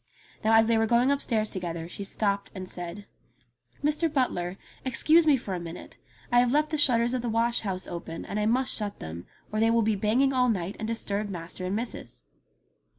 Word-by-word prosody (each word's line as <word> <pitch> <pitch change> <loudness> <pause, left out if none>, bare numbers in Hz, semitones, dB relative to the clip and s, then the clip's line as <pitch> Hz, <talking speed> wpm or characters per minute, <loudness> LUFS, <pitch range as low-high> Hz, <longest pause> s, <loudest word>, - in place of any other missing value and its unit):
Now 220 +1 +4
as 225 0 +6
they 225 0 +3
were 225 - +2
going 240 +4 +3
upstairs 225 -6 0
to 190 - -3
gether 165 -2 -4
she 200 - -6
stopped 200 0 -1
and 185 -1 -6
said: 180 +3 -7 0.8
"Mr. 305 +2 +1
Butler, 195 - -1 0.3
excuse 310 +6 +4
me 290 -3 +6
for 205 -6 -5
a 180 - -2
minute. 170 0 -9 0.3
I 245 - +6
have 245 0 +3
left 300 +2 +2
the 310 - 0
shutters 240 -4 +4
of 255 - 0
the 240 - -2
wash 230 +1 +1
house 190 -3 -3
open, 170 -1 -6
and 210 - -3
I 210 - +1
must 255 +3 +2
shut 205 -2 -3
them, 80 +2 -8 0.2
or 215 - -1
they 225 +1 +4
will 230 0 +3
be 215 0 +2
banging 235 +7 +2
all 250 -1 +3
night 190 -2 -1
and 220 - -3
disturb 210 -2 -2
master 180 0 -5
and 190 - -1
missus 230 +2 -6
220 Hz, 215 wpm, -27 LUFS, 190-245 Hz, 0.8 s, as